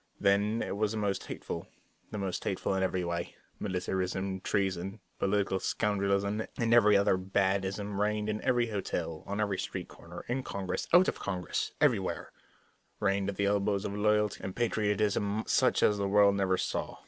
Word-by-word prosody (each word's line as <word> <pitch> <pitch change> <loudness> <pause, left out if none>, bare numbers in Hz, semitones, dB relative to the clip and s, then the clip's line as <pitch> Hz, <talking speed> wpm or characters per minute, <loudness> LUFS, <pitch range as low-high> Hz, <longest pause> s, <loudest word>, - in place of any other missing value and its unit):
Then 100 +3 +2
it - - -3
was 105 0 +1
the - - -3
most 100 -2 -1
hateful; - - -5 0.4
the 105 - -5
most 95 -3 -3
hateful - - -1
in 95 - 0
every 95 -1 0
way. 85 0 -3 0.2
Militarism, 95 0 -2
treason, 95 0 -1 0.2
political 100 -1 +1
scoundrelism, 100 +1 0 0.2
and 115 -1 +2
every 105 -3 +6
other 100 -1 +3
bad 95 +1 +1
ism 100 +1 -3
reigned 105 0 0
in 110 0 -2
every 120 -2 +2
hotel, 85 -5 -3
on 100 +1 -3
every 100 -3 0
street - - -4
corner, - - -11
in 125 +2 -1
Congress, 100 -6 -4
out 180 +2 +7
of - - -1
Congress 90 -3 -2
everywhere; - - +1 0.7
reigned 100 -1 +1
right 100 - -1
at - - -16
the 100 - +1
elbows 100 0 +1
of 100 - -3
loyalty 105 0 +2
and 95 0 -5
patriotism 105 -2 +1
such - - +3
as 105 -1 +3
the 100 - 0
world 100 0 +5
never 95 -2 +1
saw. - - -3
100 Hz, 175 wpm, -30 LUFS, 95-105 Hz, 0.7 s, out